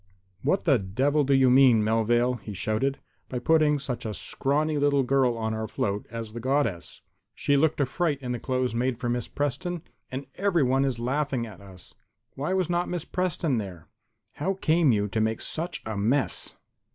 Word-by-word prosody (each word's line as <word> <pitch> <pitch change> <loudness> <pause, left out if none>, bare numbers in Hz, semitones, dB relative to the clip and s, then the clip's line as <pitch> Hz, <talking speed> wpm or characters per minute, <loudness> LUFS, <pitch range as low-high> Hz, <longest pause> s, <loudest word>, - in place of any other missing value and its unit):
"What 170 +8 +1
the 140 -7 +4
devil 135 +10 +1
do 140 - -1
you 130 -1 +5
mean, 125 -4 +6
Melvale," 120 +3 +2
he 100 0 -7
shouted, 110 +8 -1 0.3
"by 125 - -3
putting 150 +3 +3
such 130 -3 -4
a 110 -2 -4
scrawny 150 +2 0
little 140 -1 +3
girl 130 -2 +2
on 110 -1 -2
our 110 0 -3
float 100 -1 -2
as 115 -1 -6
the 120 - -5
Goddess? 130 -8 -1 0.3
She 145 - +1
looked 155 +2 +2
a 140 - +3
fright 155 +2 0
in 125 -3 -5
the 120 - -2
clothes 130 0 -1
made 120 +1 0
for 120 -1 -3
Miss 120 -1 -1
Preston, 145 +5 -3 0.3
and 135 +2 -4
everyone 140 -9 +2
is 130 -4 -1
laughing 130 0 -1
at 100 -4 -11
us. 95 -4 -14 0.4
Why 145 +6 -3
was 185 -3 +1
not 175 0 0
Miss 175 -3 -3
Preston 170 -8 -1
there? 90 -6 -8 0.4
How 190 +6 -2
came 165 -5 +3
you 105 -2 +1
to 110 +2 -1
make 110 0 0
such 170 +3 -3
a 110 -1 -3
mess?" 120 +8 0
130 Hz, 190 wpm, -26 LUFS, 115-145 Hz, 0.4 s, mean